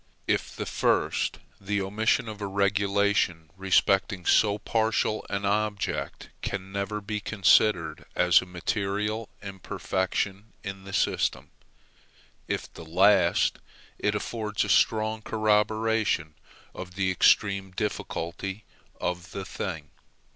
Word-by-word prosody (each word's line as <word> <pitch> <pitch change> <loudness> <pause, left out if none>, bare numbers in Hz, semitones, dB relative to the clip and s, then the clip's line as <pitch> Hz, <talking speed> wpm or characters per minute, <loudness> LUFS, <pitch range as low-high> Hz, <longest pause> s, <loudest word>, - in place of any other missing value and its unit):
If - - -1
the - - -4
first, - - +1 0.2
the 100 +1 -1
omission 110 +5 +1
of 105 -1 -7
a 100 - -2
regulation 100 -4 +1
respecting 95 0 +2
so 105 -1 +4
partial 110 0 0
an 100 0 -2
object 105 0 -2
can 95 -1 -4
never 100 +2 -3
be 105 +1 -3
considered 100 -4 +3
as 90 -1 +5
a 95 - -10
material 105 +4 -2
imperfection 95 +1 -3
in 95 -1 -7
the 100 - -9
system. - - 0 1.0
If - - -3
the - - -10
last, 90 +2 +3 0.4
it 105 0 +1
affords 105 0 -2
a - - -4
strong 110 0 +2
corroboration 110 -5 +1 0.4
of 90 -1 -8
the 95 -1 +1
extreme 100 +1 +3
difficulty 95 0 -4 0.4
of 90 0 -3
the 100 -1 -5
thing. 80 -8 -5
100 Hz, 115 wpm, -27 LUFS, 95-105 Hz, 1.0 s, as